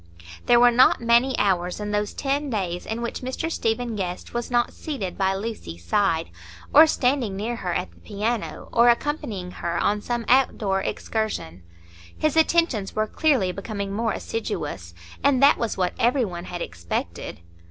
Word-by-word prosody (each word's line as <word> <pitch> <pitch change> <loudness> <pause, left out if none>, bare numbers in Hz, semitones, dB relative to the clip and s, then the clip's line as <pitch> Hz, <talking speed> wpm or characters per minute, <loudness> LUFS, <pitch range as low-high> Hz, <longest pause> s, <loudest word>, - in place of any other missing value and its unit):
There 240 0 +6
were 245 0 +7
not 250 +2 +5
many 235 +3 +3
hours 180 -2 +1
in 210 0 -4
those 210 0 0
ten 280 +1 -1
days 180 -6 -3
in 225 +2 -3
which 235 - -4
Mr 260 +6 -3
Stephen 230 -3 -1
Guest 180 -3 -5
was 240 0 -3
not 240 -1 +1
seated 250 - -5
by 190 0 +1
Lucy's 195 - -6
side, 180 - +1 0.4
or 315 +2 +9
standing 250 -8 +1
near 230 +4 -3
her 180 -5 -3
at 180 +2 -2
the - - -22
piano, 220 +2 -3
or 235 +1 +6
accompanying 235 - -1
her 170 -1 -3
on 205 +3 +1
some 240 +1 -3
outdoor 215 -7 +2
excursion; 200 - -3 0.6
his 310 -1 +1
attentions 320 - +2
were 215 - +1
clearly 250 -6 +1
becoming 200 +1 -5
more 225 +2 0
assiduous, 145 - -4 0.3
and 280 -2 +4
that 285 - +6
was 230 -2 -2
what 180 -1 0
every 245 +1 +3
one 175 -3 -6
had 175 -1 -5
expected. 85 -1 -5
220 Hz, 165 wpm, -24 LUFS, 190-245 Hz, 0.6 s, or